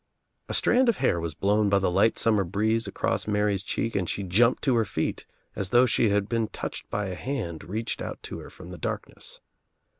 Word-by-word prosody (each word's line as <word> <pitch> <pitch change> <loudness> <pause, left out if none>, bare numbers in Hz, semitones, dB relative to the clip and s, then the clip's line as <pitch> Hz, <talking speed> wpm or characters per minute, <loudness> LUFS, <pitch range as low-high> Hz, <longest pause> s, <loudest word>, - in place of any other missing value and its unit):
A - - 0
strand 255 0 +4
of 225 - +2
hair 85 - +1
was 80 -2 -4
blown 105 +4 +2
by 100 - +4
the 95 -2 +1
light 100 +5 +3
summer 110 -3 +3
breeze 110 +5 0
across - - -2
Mary's 105 -2 +1
cheek 115 +3 -2
and 90 -3 0
she 100 - -2
jumped 110 +7 +3
to 130 -4 +3
her 115 - +3
feet 100 - -3 0.3
as 95 -2 -3
though 120 +3 +5
she 115 -2 +2
had 100 0 +1
been 115 -1 0
touched - - -6
by 105 - -2
a 95 - -4
hand 105 - -4
reached 110 +5 -3
out - - -5
to - - -6
her - - -10
from - - -12
the - - -9
darkness. - - -6
105 Hz, 215 wpm, -26 LUFS, 95-115 Hz, 0.3 s, though